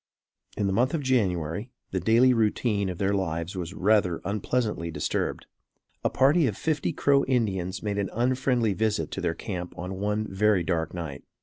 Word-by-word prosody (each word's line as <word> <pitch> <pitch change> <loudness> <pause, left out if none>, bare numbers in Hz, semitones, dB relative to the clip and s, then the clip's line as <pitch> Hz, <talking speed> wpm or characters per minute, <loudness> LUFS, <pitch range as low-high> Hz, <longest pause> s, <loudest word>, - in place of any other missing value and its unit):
In 105 - 0
the 95 - +1
month 125 +9 +2
of 150 - -2
January, 100 - 0 0.2
the 95 - 0
daily 115 +7 +5
routine 105 -3 +1
of 90 - -5
their 100 +1 +1
lives 85 -2 -2
was 90 0 -5
rather 100 -4 +2
unpleasantly 105 -3 -1
disturbed. - - -2 0.6
A - - +2
party 140 +4 +4
of 105 - -3
fifty 155 -3 0
Crow 140 -1 +3
Indians 100 -8 -1
made 100 -1 -1
an 100 -2 -1
unfriendly 125 -2 +1
visit 105 -6 -1
to - - -4
their 80 - 0
camp 90 -2 -6
on 95 +2 -5
one 105 +2 0
very 95 -1 +2
dark 85 -1 -1
night. 80 -6 -6
100 Hz, 175 wpm, -27 LUFS, 90-120 Hz, 0.6 s, daily